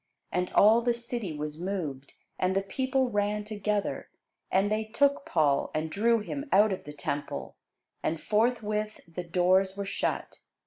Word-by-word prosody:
And 180 0 -1
all 220 +3 +6
the 240 0 +1
city 235 -5 -3
was 150 +1 -5
moved, 160 -8 -4 0.3
and 185 +1 +1
the 195 - +2
people 260 +5 0
ran 205 0 0
together: 210 -1 -2 0.4
and 195 +2 +2
they 215 +1 +1
took 280 +6 +1
Paul, 145 -4 +2
and 155 +1 -1
drew 230 +4 +3
him 280 +7 -5
out 210 +2 +5
of 185 - -6
the 150 - -8
temple: 145 -1 -4 0.5
and 160 0 -1
forthwith 215 0 0
the 170 +2 -6
doors 185 +3 +2
were 200 - -2
shut. 195 - -2
205 Hz, 160 wpm, -29 LUFS, 175-220 Hz, 0.5 s, all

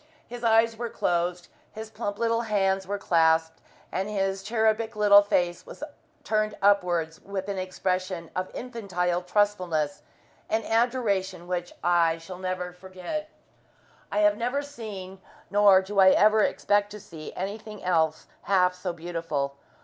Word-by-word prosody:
His 245 0 -9
eyes 225 0 +4
were 235 0 -3
closed, 175 -2 -1 0.3
his 220 0 -8
plump 205 -3 -4
little 230 0 +1
hands 195 -4 0
were 205 +1 -2
clasped, 160 -3 +2 0.3
and 195 +2 -2
his 195 -2 -1
cherubic 220 +1 0
little 205 -1 +7
face 175 -3 0
was - - -10 0.4
turned 215 -1 0
upwards 180 -5 +2
with 195 -1 -5
an 200 -2 -3
expression 185 -2 -3
of 185 0 -2
infantile 185 -8 -2
trustfulness 180 -6 0 0.5
and 220 0 0
adoration 210 -7 0
which 175 -1 -3
I 170 -2 +3
shall 180 +2 -10
never 185 -1 -3
forget. 190 - -6 0.8
I 205 - +1
have 210 0 +4
never 250 +5 -1
seen, 200 -9 -8 0.3
nor 200 -2 +6
do 200 +1 -2
I 190 -1 +8
ever 215 +3 +5
expect 205 0 +1
to 210 - -8
see, 160 -5 -10
anything 210 +2 -6
else 160 -3 +1 0.2
half 180 -2 +3
so 180 -1 -4
beautiful. 165 -5 -3
195 Hz, 140 wpm, -26 LUFS, 180-215 Hz, 0.8 s, I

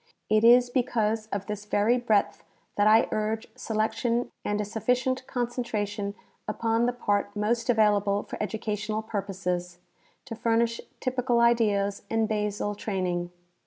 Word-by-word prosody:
It 215 0 +4
is 245 +1 +6
because 225 -4 0
of 200 -2 -4
this 210 0 -5
very 210 +4 +2
breadth 220 -4 +1 0.3
that 205 0 +3
I 220 +2 +6
urge 215 +1 -1
selection 230 +1 -1
and 205 0 -1
a 210 - -1
sufficient 250 +4 -1
concentration 215 -5 -2 0.3
upon 225 +2 +1
the - - +2
part 205 -4 -1
most 230 +3 0
available 205 -3 +3
for - - -7
educa 215 0 -3
tional 215 +1 -3
purposes, 185 -4 -3 0.5
to 250 - -6
furnish 230 0 +1 0.2
typical 250 -1 0
ideas 210 -4 +2
and 225 -1 +1
basal 210 -1 -1
training. 180 -4 -2
215 Hz, 135 wpm, -27 LUFS, 205-235 Hz, 0.5 s, is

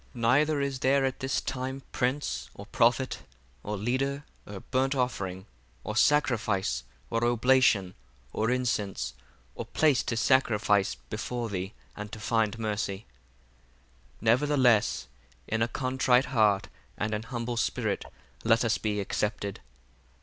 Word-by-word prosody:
15 120 - -8
Neither 145 +5 +3
is 140 -2 -2
there 135 +1 +3
at 130 -1 -2
this 135 -1 0
time 130 +1 -4
prince, 125 - -1
or 100 - -9
prophet, 120 +3 +2 0.4
or 105 0 -4
leader, 135 +6 -1 0.2
or 100 -2 -7
burnt 135 +2 0
offering, 95 -8 -2 0.4
or 105 - -4
sacrifice, 110 - +2 0.3
or 115 0 0
oblation, 120 -5 +3 0.4
or 110 +2 0
incense, 105 - -1 0.4
or - - -5
place 150 -6 +2
to 115 - -3
sacrifice 105 -5 +3
before 120 -2 -5
thee, 95 +1 -4 0.2
and 105 0 -7
to 110 - -6
find 110 0 0
mercy. 105 -2 -3 1.1
16 - - -32
Nevertheless 120 - +3 0.4
in 110 +1 -1
a 115 - +3
contrite 130 0 +2
heart 105 -4 +3 0.3
and 105 +1 -2
an 105 - -1
humble 120 +1 -4
spirit 115 - -1 0.4
let 115 +1 +3
us 115 - +1
be 105 -1 -1
accepted. 100 0 -2
115 Hz, 135 wpm, -28 LUFS, 105-130 Hz, 1.1 s, Neither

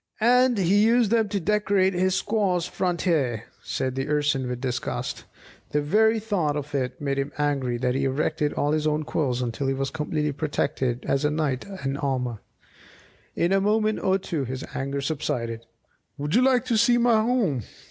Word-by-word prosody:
"And 250 +1 +4
he 200 +2 +3
used 230 -1 +3
them 225 -3 +2
to 200 0 -1
decorate 200 0 +2
his 185 +1 +1
squaw's 195 -5 0
front 180 -2 -2
hair!" 130 - +1 0.2
said 130 -1 -2
the 135 +1 -3
Urson 145 -3 +1
with 125 -1 -3
disgust. 125 -1 -3 0.5
The 150 - +2
very 220 +8 +3
thought 185 -9 -1
of 145 0 -6
it 130 +2 -2
made 140 -2 -1
him 140 +1 -2
so 150 - 0
angry 135 -4 0
that 125 0 0
he 135 +1 0
erected 150 +3 0
all 145 - 0
his 155 0 +1
own 155 0 0
quills 130 -5 -1
until 125 +3 -2
he 135 - 0
was 135 0 -2
as - - -20
completely 150 -1 -1
protected 135 -4 -2
as 135 +1 0
a 150 - +3
knight 150 -3 -1 0.2
in 135 +1 -1
armour. 125 -5 -2 1.0
In 170 - +1
a 195 0 +3
moment 215 +1 +1
or 190 0 +2
two 170 -6 -3
his 130 +1 -5
anger 140 +1 -3
subsided. 115 -6 -3 0.5
"Would 145 +1 -3
you 240 - +5
like 255 -1 +3
to 240 -3 +1
see 240 +2 +4
my 235 -2 +4
home?" 215 - +1
150 Hz, 190 wpm, -25 LUFS, 135-200 Hz, 1.0 s, you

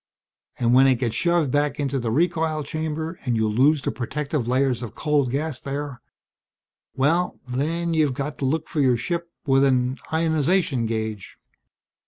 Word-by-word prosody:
And 120 0 +2
when 135 +2 +7
it 130 - +4
gets 120 -2 -2
shoved 170 -2 +1
back 145 +1 0
into 140 -1 -1
the 120 -2 -2
recoil 160 +2 +1
chamber 160 +2 -4
and 125 -3 0
you 110 -1 +1
lose 135 +7 +3
the - - -1
protective 140 +1 -3
layers 130 -1 +1
of 120 - -7
cold 145 -4 +1
gas 145 +2 -2
there 140 -3 -5 0.9
well, 165 +7 +1
then 165 +7 -1
you've 150 -5 +2
got 140 0 -4
to 135 - -1
look 155 +4 0
for 155 - -1
your 125 -3 +3
ship 170 +7 -3 0.2
with 135 -1 +4
an 130 -1 +2
ionization 160 -4 +1
gauge! 110 -3 -4
140 Hz, 165 wpm, -23 LUFS, 125-160 Hz, 0.9 s, when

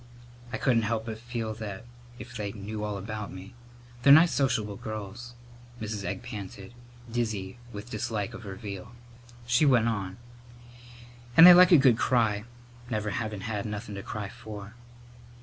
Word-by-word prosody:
"I 130 - -2
couldn't 120 -4 +2
help 110 +1 -1
but 110 -1 -6
feel 115 -2 -4
that 105 -1 -7 0.3
if 120 0 -10
they 105 -3 -4
knew 105 0 -6
all 105 -1 -3
about 105 +1 -5
me 95 +2 -10 0.2
" 120 0 -22
"They're 140 - +6
nice 160 +4 +8
sociable 110 -7 0
girls," 110 +3 -7 0.4
Mrs. 105 -2 -4
Egg 90 - -4
panted, 100 -3 -8 0.4
dizzy 110 -4 -3
with 105 +2 -8
dislike 110 0 -3
of 120 - -8
her 100 -4 -7
veal. 100 +2 -8 0.5
She 120 +4 +3
went 125 -6 +4
on: 100 -4 -3 1.2
"And 165 - +11
they 180 - +12
like 180 +1 +8
a 170 - +9
good 130 -4 +5
cry, 110 -4 +2 0.4
never 105 -2 -2
havin' 105 -1 -3
had 105 0 -3
nothin' 105 +1 -5
to 100 - -5
cry 105 -1 -5
for." 105 0 -9
110 Hz, 165 wpm, -28 LUFS, 100-120 Hz, 1.2 s, they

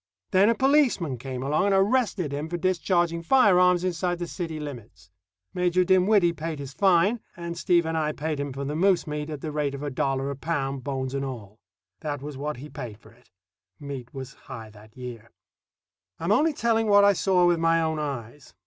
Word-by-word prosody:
Then 195 +3 +5
a 230 - +3
policeman 250 - +2
came 130 0 -5
along 150 +7 +1
and 200 - +3
arrested 195 - +1
him 150 +3 -4
for 175 - -2
discharging 175 -1 +1
firearms 180 -4 +4
inside 180 0 -1
the 175 - -3
city 165 -2 -5
limits. 115 -11 -9 0.4
Major 180 0 +2
Dinwiddie 185 -1 +4
paid 160 0 -5
his 140 -1 -7
fine, 195 - +3 0.2
and 170 0 -5
Steve 175 -1 +2
and 160 0 -2
I 155 -1 0
paid 155 0 -3
him 140 0 -3
for 140 +1 -5
the 145 +2 -3
moose 185 +2 +3
meat 150 0 -4
at 150 -3 -6
the 155 - -4
rate 145 -2 -1
of 140 - -7
a 145 - -3
dollar 135 +1 -1
a - - -4
pound, 140 -3 -3
bones 130 -2 -3
and 140 0 -2
all. 115 -5 -7 0.4
That 145 -2 -4
was 145 +1 -7
what 150 +2 -4
he 140 +4 -9
paid 125 -8 -8
for - - -19
it. 120 +2 -25 0.5
Meat 135 -4 -7
was 135 0 -8
high 115 -6 -10
that 110 +2 -17
year. 120 -3 -8 0.9
I - - -10
am 170 - +1
only 300 +8 +3
telling 225 -4 +1
what 205 -1 +6
I 200 0 +6
saw 185 -2 +2
with 175 -1 +3
my 165 0 +3
own 160 -1 -1
eyes. 135 - -6
155 Hz, 205 wpm, -26 LUFS, 135-180 Hz, 0.9 s, what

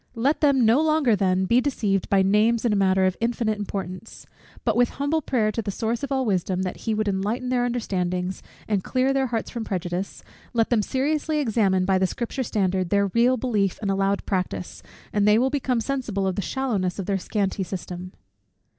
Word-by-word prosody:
Let 265 +6 +1
them 275 -5 +4
no 230 +7 +5
longer 310 -7 +3
then 190 -1 +1
be 235 +6 +3
deceived 210 -9 -1
by 195 -1 +4
names 215 +4 +3
in 225 - +3
a - - +2
matter 190 -1 +3
of 185 -1 +1
infinite 230 -2 0
importance: 195 0 -6 0.4
but 225 -3 +2
with 245 0 +3
humble 285 +3 0
prayer 225 -6 +1
to 230 - -2
the 205 - -5
Source 225 +3 -2
of 280 - -4
all 265 -1 +1
wisdom, 185 -2 0
that 185 - -4
he 220 - +2
would 215 0 -1
enlighten 210 +6 -1
their 245 -1 +1
understandings, 185 -6 -2 0.3
and 205 -4 0
clear 260 +1 +1
their 270 -1 +1
hearts 230 -2 -3
from 235 -2 -4
prejudice; 180 -1 -4 0.3
let 230 -1 +1
them 230 -3 +4
seriously 295 +6 -1
examine 210 -9 +2
by 190 0 +2
the 190 - +2
Scripture 240 +6 -4
standard 190 -6 0
their 200 +1 +2
real 245 +2 +4
belief 210 -6 0
and 200 -2 -1
allowed 195 +1 0
practice, 185 -2 -3 0.3
and 205 0 +2
they 210 +1 +6
will 260 +3 +2
become 260 -4 0
sensible 230 -6 -2
of 190 -1 0
the - - -1
shallowness 200 -6 -1
of 195 - -4
their 195 0 0
scanty 195 0 -2
system. 180 0 -6
215 Hz, 200 wpm, -24 LUFS, 190-245 Hz, 0.4 s, they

